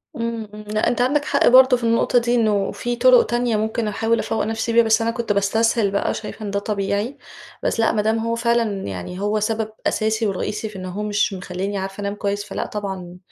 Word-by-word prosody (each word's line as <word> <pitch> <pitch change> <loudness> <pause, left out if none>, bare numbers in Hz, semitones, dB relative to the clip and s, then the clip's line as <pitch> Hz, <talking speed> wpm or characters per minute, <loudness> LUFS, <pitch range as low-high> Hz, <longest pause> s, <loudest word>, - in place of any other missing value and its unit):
إمم، 230 -1 -3
إمم، 210 0 -9
لأ 215 +1 0
أنت 245 0 +1
عندك 290 +4 +2
حق 280 - +2
برضه 255 +1 +7
في 240 - -9
النقطة 230 +1 +3
دي، 240 +1 0
إنه 210 -4 +1
في 240 0 -3
طُرق 250 0 +6
تانية 240 0 0
ممكن 220 +1 -1
أحاول 225 +2 0
أفوَّق 225 - -1
نفسي 225 +1 -2
بيها، 235 0 +6
بس 220 0 +3
أنا 230 0 +1
كنت 230 -2 -2
باستسهل 205 +1 +2
بقى، 200 - 0
شايفة 215 0 -7
إن 200 - -4
ده 200 - 0
طبيعي. 205 +4 -2 0.5
بس - - 0
لأ، 225 - +3
ما 210 - +1
دام 220 +2 +1
هو 230 +1 -1
فعلًا 230 -4 0
يعني 95 - -6
هو 210 +1 0
سبب 220 +1 -1 0.2
أساسي 220 +1 0
ورئيسي 210 +2 -3
في 210 - -14
إنه 185 -1 -6
هو 200 +4 -4
مش 210 0 0
مخليني 190 +2 -4
عارفة 195 +1 -5
أنام 200 0 -3
كويس، 205 0 -2
فلأ 205 - -4
طبعًا، 190 -4 -6
220 Hz, 220 wpm, -21 LUFS, 200-230 Hz, 0.5 s, برضه